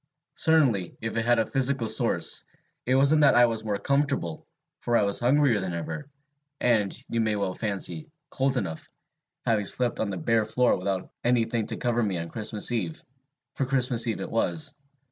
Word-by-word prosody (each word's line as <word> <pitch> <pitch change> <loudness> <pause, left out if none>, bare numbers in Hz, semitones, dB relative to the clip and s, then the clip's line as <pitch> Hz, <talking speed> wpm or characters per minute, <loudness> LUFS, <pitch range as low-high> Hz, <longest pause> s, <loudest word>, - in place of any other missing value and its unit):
Certainly, 135 - +2
if 110 0 -4
it 115 0 0
had 120 0 +4
a 115 - +2
physical 135 -2 0
source, - - +1 0.4
it 130 - +3
wasn't 140 +3 +5
that 145 - +6
I 120 - +7
was 115 -2 -2
more 105 -2 -1
comfortable, 140 - -1 0.3
for 120 -1 +1
I - - +3
was 100 0 +1
hungrier 125 -2 +3
than 95 -3 -3
ever, 140 - -5 0.5
and, 110 -5 +2 0.2
you 115 - -1
may 110 -1 +1
well 100 -2 -1
fancy, 110 - -3 0.2
cold 135 0 0
enough, 80 -8 -4 0.6
having 110 -3 +1
slept 120 +4 -1
on 110 - 0
the 95 - -3
bare 110 +6 +1
floor 125 +3 +2
without 95 0 -3
any 120 -1 +3
thing 115 -1 -2
to - - -3
cover 120 -1 0
me 100 -5 0
on 85 0 -5
Christmas 110 +1 -2
Eve 90 -9 -3 0.5
for 135 - -2
Christmas 125 -3 0
Eve 110 - -2
it - - -5
was. 145 +6 -1
115 Hz, 185 wpm, -26 LUFS, 100-130 Hz, 0.6 s, I